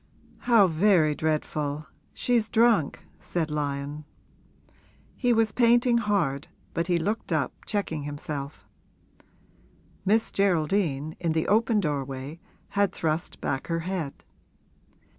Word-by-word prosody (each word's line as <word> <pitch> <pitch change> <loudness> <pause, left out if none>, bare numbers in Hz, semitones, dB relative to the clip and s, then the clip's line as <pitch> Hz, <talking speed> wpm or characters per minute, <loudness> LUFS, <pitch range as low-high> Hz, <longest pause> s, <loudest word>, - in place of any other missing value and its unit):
'How 230 -5 +5
very 170 -2 +3
dreadful 150 -1 -2 0.3
she's 235 -3 0
drunk!' 225 -10 +2
said 160 -3 -2
Lyon. 145 0 -3 1.1
He 245 -2 +1
was 225 -2 +3
painting 240 0 +4
hard, 190 -11 0 0.3
but 165 0 -1
he 175 -2 +2
looked 205 +7 -2
up, - - 0
checking 200 -8 -2
himself: 145 0 -6 1.4
Miss 220 +4 +2
Geraldine, 160 -5 +1
in 165 -2 0
the 160 0 0
open 220 +1 +3
doorway, 140 -2 -3 0.3
had 200 -1 +1
thrust 160 +1 -2
back 135 -1 -2
her 165 0 -1
head. 170 -5 -4
165 Hz, 110 wpm, -26 LUFS, 150-210 Hz, 1.4 s, How